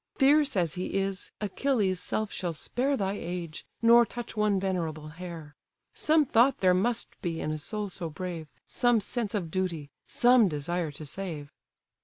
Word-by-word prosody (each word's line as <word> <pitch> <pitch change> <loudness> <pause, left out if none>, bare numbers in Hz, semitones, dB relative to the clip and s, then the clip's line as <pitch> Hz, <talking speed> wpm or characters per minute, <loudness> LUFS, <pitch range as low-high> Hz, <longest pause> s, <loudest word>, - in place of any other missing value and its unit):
Fierce 285 -1 +4
as 170 -5 +1
he 180 +1 -4
is, 195 0 -1
Achilles' 205 -3 0
self 215 +3 -2
shall 175 -2 -3
spare 265 - -1
Thy 195 -1 -1
age, 175 -4 -5 0.2
nor 235 +1 +8
touch 235 +1 -7
one 210 -2 +2
venerable 165 -5 -2
hair; 165 -2 -8 0.4
Some 310 -1 +3
thought 245 +2 +4
there 185 -1 +4
must 225 +6 +1
be 170 -5 -2
in 155 - -2
a 155 - -2
soul 210 +6 -4
so 175 -2 -4
brave, 170 -1 -5 0.2
Some 245 -2 +3
sense 220 +1 -2
of 175 -6 -3
duty, 170 -6 -2 0.2
some 245 -3 +5
desire 165 +2 -2
to 150 +1 -9
save." 155 -3 -6
190 Hz, 165 wpm, -28 LUFS, 165-230 Hz, 0.4 s, nor